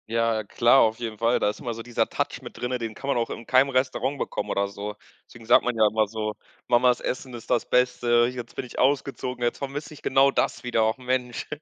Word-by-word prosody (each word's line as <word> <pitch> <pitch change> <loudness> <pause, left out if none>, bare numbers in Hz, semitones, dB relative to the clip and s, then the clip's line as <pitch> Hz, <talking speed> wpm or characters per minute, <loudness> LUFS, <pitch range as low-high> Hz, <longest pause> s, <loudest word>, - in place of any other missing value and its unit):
Ja, 115 -1 +1
klar, 120 +5 +4
auf 110 0 +2
jeden 115 -3 -5
Fall. 115 +1 +2
Da - - +2
ist 105 - -6
immer 120 - -4
so 115 0 -7
dieser 120 0 0
Touch - - -3
mit - - -10
drinnen, 125 +1 -2
den 115 -2 -5
kann 135 - -8
man 140 - +1
auch 115 -1 -1
in 115 - -7
keinem 130 +3 +4
Restaurant 130 +1 0
bekommen - - -3
oder 100 0 0
so. 100 +1 -6 0.3
Deswegen 115 -1 -14
sagt 120 - +5
man 125 -1 -1
ja 110 - +5
immer 110 0 +1
so: 110 0 -3 0.3
„Mamas 125 0 +4
Essen 130 0 -4
ist 120 -2 -10
das 120 - +1
Beste. 120 -1 +3
Jetzt 120 -2 -8
bin - - -4
ich 125 - -8
ausgezogen, 130 -2 0
jetzt 120 - 0
vermisse 145 +2 -5
ich 150 - -14
genau 135 +1 +4
das 125 - -1
wieder, 115 -3 +1
och 110 - -1
Mensch.“ 125 -1 -2
120 Hz, 240 wpm, -25 LUFS, 115-130 Hz, 0.3 s, sagt